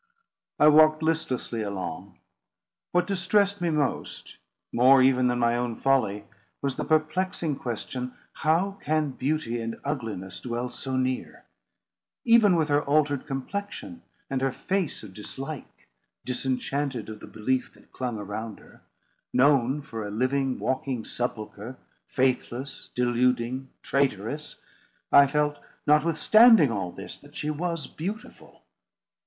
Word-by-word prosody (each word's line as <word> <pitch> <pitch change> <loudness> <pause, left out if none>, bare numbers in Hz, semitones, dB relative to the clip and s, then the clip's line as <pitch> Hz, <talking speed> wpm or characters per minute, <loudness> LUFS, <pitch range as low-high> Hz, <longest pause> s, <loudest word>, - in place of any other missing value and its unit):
I 150 - +6
walked 155 +1 +6
listlessly 160 -8 -1
along. 100 -6 -5 0.7
What 180 0 +2
distressed 200 +1 +1
me 175 - +1
most—more 135 -3 +1
even 130 -1 +4
than 125 0 +1
my 120 0 +2
own 120 -1 -1
folly—was 110 -1 -1
the - - -3
perplexing 155 -1 0
question, 125 +1 -5 0.2
How 180 +7 +1
can 155 -1 +1
beauty 130 -3 -2
and 115 0 -5
ugliness 110 -10 -4
dwell 120 0 -3
so 130 +1 -3
near? 130 0 -2 0.8
Even 230 -5 +6
with 160 -2 +2
her 145 0 +3
altered 145 -2 +1
complexion 200 - -5 0.3
and 135 -2 -2
her 135 0 +1
face 185 - -2
of 100 -3 -10
dislike; 135 +8 -8 0.4
disenchanted 130 -1 -2
of 110 -1 -8
the - - -11
belief 130 +4 -1
that - - -22
clung 125 -3 -3
around 105 +2 -5
her; - - -19 0.5
known 135 +1 +3
for 115 -5 -6
a 105 - -5
living, 130 +4 0
walking 130 -3 -2
sepulchre, 115 0 -5 0.3
faithless, 130 +1 -1
deluding, 125 +1 +1
traitorous; 140 +1 -1 0.6
I 140 0 +8
felt 150 +1 0 0.3
notwithstanding 165 - +6
all 95 -5 -2
this, - - -9
that - - -18
she 150 - -2
was 165 -1 -2
beautiful. 200 +7 -8
135 Hz, 125 wpm, -26 LUFS, 120-155 Hz, 0.8 s, I